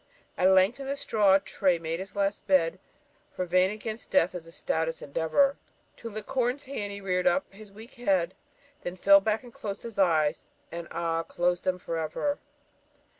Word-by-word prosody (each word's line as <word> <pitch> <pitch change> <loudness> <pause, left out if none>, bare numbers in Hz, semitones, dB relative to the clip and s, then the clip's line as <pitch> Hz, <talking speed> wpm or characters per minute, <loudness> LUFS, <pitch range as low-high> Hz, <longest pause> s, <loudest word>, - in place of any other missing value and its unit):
At 185 - +4
length, 190 +6 +4
in 270 - -6
the 275 - -1
straw, 210 -8 +4
Tray 190 -2 +1
made 165 0 -4
his 190 +1 -8
last 200 0 -1
bed 185 -2 +3 0.6
For 185 - -1
vain 185 +1 +3
against 215 +2 -6
death 170 - +3
is 175 -2 -7
the 165 - -13
stoutest 160 0 -2
endeavour 165 - +2 0.4
To 230 - -7
lick 215 -1 -6
Corin's 260 +1 -1
hand 215 -7 -4
he 200 - -6
rear'd 185 0 0
up 280 -4 +1
his 205 0 -13
weak 220 +5 -13
head, 190 -7 +1 0.5
Then 175 - -5
fell 200 +2 +7
back, 215 +4 0
closed 200 -2 -6
his 230 -3 -7
eyes, 160 -4 +2 0.2
and 170 0 -6
ah! 165 -1 -1
closed 175 +1 -1
them 185 -1 +1
for 165 -2 -4
ever. 285 - -2
190 Hz, 180 wpm, -28 LUFS, 170-215 Hz, 0.6 s, fell